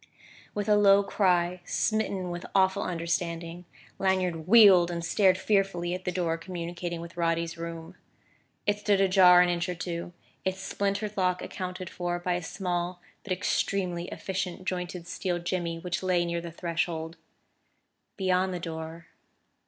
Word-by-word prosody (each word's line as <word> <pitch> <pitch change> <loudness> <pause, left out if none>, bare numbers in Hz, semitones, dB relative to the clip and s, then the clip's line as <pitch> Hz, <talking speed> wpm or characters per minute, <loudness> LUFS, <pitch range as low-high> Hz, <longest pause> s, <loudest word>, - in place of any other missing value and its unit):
With 205 0 -2
a 210 - +5
low 200 -1 +6
cry, 180 -3 +1
smitten 195 -3 -1
with 175 +1 -6
awful 190 -1 +3
understanding, 170 0 -3 0.3
Lanyard 185 -4 0
wheeled 195 -5 +8
and 170 -1 -3
stared 185 +1 +3
fearfully 190 -3 0
at 185 0 -5
the 180 - 0
door 170 -2 -1
communicating 175 -1 -5
with 170 0 -10
Roddy's 165 0 0
room. 165 -1 -7 0.7
It 205 0 +1
stood 205 -2 +2
ajar 185 -2 +7
an 180 - +1
inch 175 +1 -1
or 180 - -2
two, 170 0 -5 0.3
its 190 0 -2
splintered 200 +2 -2
lock 180 -1 +1
accounted 185 -1 -5
for 175 0 -3
by 175 +1 -1
a 175 - -1
small 175 0 -3 0.2
but 200 - -9
extremely 180 -1 -1
efficient 185 -1 -4
jointed 180 -1 -3
steel 180 0 -2
jimmy 175 -1 -2
which 175 +2 -3
lay 180 -2 +2
near 170 0 -2
the 170 0 -7
threshold. 165 -1 -3 1.0
Beyond 185 -1 +1
the - - -3
door 165 0 -6
180 Hz, 150 wpm, -28 LUFS, 170-190 Hz, 1.0 s, wheeled